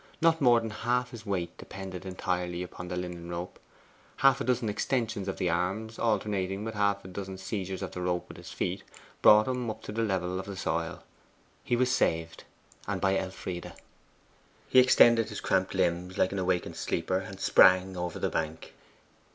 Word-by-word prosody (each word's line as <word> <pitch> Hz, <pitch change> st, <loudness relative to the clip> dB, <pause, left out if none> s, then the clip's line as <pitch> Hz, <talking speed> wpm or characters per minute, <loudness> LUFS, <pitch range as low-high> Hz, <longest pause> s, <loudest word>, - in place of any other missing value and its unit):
Not 165 Hz, -1 st, +3 dB
more 120 Hz, -3 st, +6 dB
than 115 Hz, -1 st, -5 dB
half 125 Hz, +3 st, -1 dB
his 110 Hz, -3 st, -10 dB
weight 90 Hz, -4 st, -2 dB
depended 95 Hz, -1 st, -7 dB
entirely 90 Hz, -1 st, -2 dB
on 90 Hz, -, -7 dB
the 90 Hz, -, -4 dB
linen 90 Hz, -1 st, -5 dB
rope. 85 Hz, +1 st, -6 dB, 0.6 s
Half 135 Hz, +1 st, +4 dB
a -, -, +1 dB
dozen 125 Hz, -3 st, 0 dB
extensions 110 Hz, -1 st, -1 dB
of 95 Hz, -, -3 dB
the 90 Hz, -2 st, 0 dB
arms, 95 Hz, +6 st, -2 dB
alternating 100 Hz, -3 st, 0 dB
with 110 Hz, 0 st, -4 dB
half 100 Hz, -2 st, 0 dB
a -, -, -6 dB
dozen 95 Hz, 0 st, -6 dB
seizures 95 Hz, 0 st, -4 dB
of -, -, -5 dB
the 90 Hz, -, -6 dB
rope 90 Hz, -1 st, -1 dB
with -, -, -11 dB
his -, -, -10 dB
feet, 95 Hz, +2 st, -2 dB, 0.4 s
brought 105 Hz, +2 st, +7 dB
him 125 Hz, -2 st, -2 dB
up 110 Hz, 0 st, -6 dB
to -, -, -6 dB
the 115 Hz, +2 st, -2 dB
level 95 Hz, -4 st, -1 dB
of 95 Hz, -, -7 dB
the 100 Hz, -1 st, -6 dB
soil. -, -, -2 dB, 0.6 s
He 120 Hz, -, +1 dB
was 125 Hz, +1 st, +2 dB
saved, 80 Hz, -6 st, 0 dB, 0.4 s
and -, -, -1 dB
by 95 Hz, 0 st, +2 dB
Elfride. 95 Hz, -2 st, -4 dB, 1.0 s
He 130 Hz, -, +7 dB
extended 120 Hz, -3 st, +6 dB
his 105 Hz, -, -5 dB
cramped 95 Hz, +1 st, 0 dB
limbs 90 Hz, 0 st, 0 dB
like 95 Hz, -, +2 dB
an 100 Hz, -, -2 dB
awakened 90 Hz, -1 st, -1 dB
sleeper, 95 Hz, +3 st, -1 dB
and 95 Hz, 0 st, -8 dB
sprang 95 Hz, 0 st, +5 dB
over 90 Hz, -1 st, -3 dB
the -, -, -1 dB
bank. 80 Hz, 0 st, -3 dB
95 Hz, 185 wpm, -29 LUFS, 90-110 Hz, 1.0 s, brought